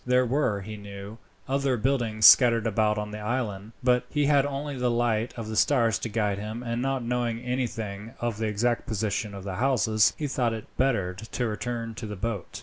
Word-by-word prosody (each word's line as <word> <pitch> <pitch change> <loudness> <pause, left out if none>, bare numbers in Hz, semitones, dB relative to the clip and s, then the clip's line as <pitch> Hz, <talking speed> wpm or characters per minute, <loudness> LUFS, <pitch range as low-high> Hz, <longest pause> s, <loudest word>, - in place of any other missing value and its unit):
There 125 0 +3
were, 125 -5 0
he 105 +2 -7
knew, 100 +2 -9 0.3
other 135 -1 +1
buildings 115 -3 +1
scattered 115 -3 +8
about 105 -1 +1
on 105 0 -3
the 105 - -6
island; 105 -2 -3
but 125 -1 +3
he 150 -1 +1
had 140 -1 +4
only 145 +1 -4
the 125 -1 0
light 120 -1 +1
of 115 -2 -5
the 110 - -4
stars 115 -4 +3
to 115 - -4
guide 105 -2 0
him, 110 +3 -5
and, 120 0 -2
not 135 -1 -1
knowing 120 -1 -1
anything 115 -4 -4
of 120 -3 -2
the 110 - 0
exact 115 +4 0
position 105 -2 -2
of 100 - -8
the 95 -2 -5
houses, 110 -5 +3
he 150 - -3
thought 125 -4 0
it 110 -1 -6
better 115 -9 +1
to 110 +5 -4
return 115 +2 -4
to 110 0 -7
the 105 - -5
boat. 100 0 -4
115 Hz, 205 wpm, -27 LUFS, 105-125 Hz, 0.3 s, scattered